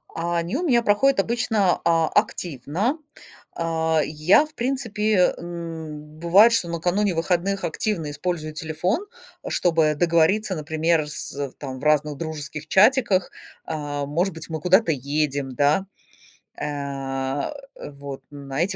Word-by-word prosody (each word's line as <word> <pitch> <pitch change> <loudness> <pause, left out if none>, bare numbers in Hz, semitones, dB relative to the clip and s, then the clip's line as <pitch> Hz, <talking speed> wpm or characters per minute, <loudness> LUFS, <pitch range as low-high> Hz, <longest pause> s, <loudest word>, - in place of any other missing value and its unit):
А 170 +1 -1
они 170 +6 -2
у 355 - -2
меня 245 -8 +3
проходят 230 +4 +3
обычно 220 -4 +1
а 165 -1 +3
активно. 175 - -1 0.6
А 160 -1 +1
я, 155 - +4
в 310 - -18
принципе, 220 -6 +1
м, 160 -3 -7
бывает, 195 +8 +6
что 175 -7 +1
накануне 175 +3 0
выходных 180 +4 0
активно 165 -3 -2
использую 155 0 -3
телефон, 175 - -2 0.4
а, - - -5
чтобы 160 -3 +2
договориться, 175 +5 +2
например, 160 0 0
с, - - -5
э, 140 -1 -3
в - - -23
там 130 -2 -7
в - - -12
разных 150 -1 +2
дружеских 155 -1 -6
чатиках. 205 - +4 0.3
А, 145 -2 -3
может 170 +7 0
быть, 160 0 -9
мы 160 -1 -4
куда-то 185 +2 +4
едем, 140 -1 -1
да? 145 +8 +2 0.7
А, 140 - -3 0.2
э, - - -8
вот 140 -1 -8
на 140 0 -4
эти 190 +3 0
165 Hz, 140 wpm, -23 LUFS, 150-190 Hz, 0.7 s, бывает